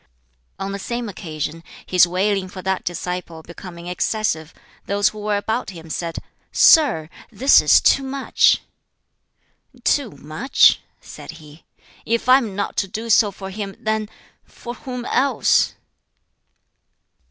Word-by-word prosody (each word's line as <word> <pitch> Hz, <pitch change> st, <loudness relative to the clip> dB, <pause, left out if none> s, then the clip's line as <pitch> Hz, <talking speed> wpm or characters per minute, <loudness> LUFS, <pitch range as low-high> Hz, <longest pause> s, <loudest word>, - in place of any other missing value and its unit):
On 195 Hz, 0 st, -4 dB
the 200 Hz, -, -5 dB
same 235 Hz, +3 st, -4 dB
occasion, 165 Hz, -4 st, -6 dB, 0.2 s
his 180 Hz, -1 st, +4 dB
wailing 190 Hz, +2 st, 0 dB
for 185 Hz, -1 st, -9 dB
that 190 Hz, 0 st, -1 dB
disciple 175 Hz, -2 st, -5 dB
becoming 170 Hz, 0 st, -11 dB
excessive, 180 Hz, -3 st, -2 dB, 0.4 s
those 200 Hz, +1 st, +2 dB
who 215 Hz, -, -11 dB
were 210 Hz, 0 st, -1 dB
about 220 Hz, +4 st, -2 dB
him 165 Hz, -4 st, -10 dB
said, 170 Hz, 0 st, -4 dB, 0.3 s
"Sir, 250 Hz, -, +5 dB, 0.2 s
this 255 Hz, +6 st, +5 dB
is -, -, +6 dB
too -, -, +3 dB
much!" 270 Hz, 0 st, +2 dB, 1.2 s
"Too 280 Hz, -5 st, +1 dB
much?" 155 Hz, -, +2 dB, 0.2 s
said -, -, -10 dB
he; 155 Hz, -1 st, -15 dB, 0.4 s
"if 230 Hz, +2 st, -1 dB
I 255 Hz, +1 st, +7 dB
am 220 Hz, -7 st, -5 dB
not 200 Hz, 0 st, -3 dB
to 195 Hz, -, 0 dB
do 225 Hz, +4 st, -4 dB
so 215 Hz, 0 st, +5 dB
for 195 Hz, 0 st, -9 dB
him, 195 Hz, -1 st, -6 dB
then 215 Hz, -1 st, -2 dB, 0.3 s
for 240 Hz, -, -9 dB
whom 250 Hz, -1 st, -7 dB
else?" 260 Hz, -2 st, +2 dB
200 Hz, 135 wpm, -21 LUFS, 170-230 Hz, 1.2 s, I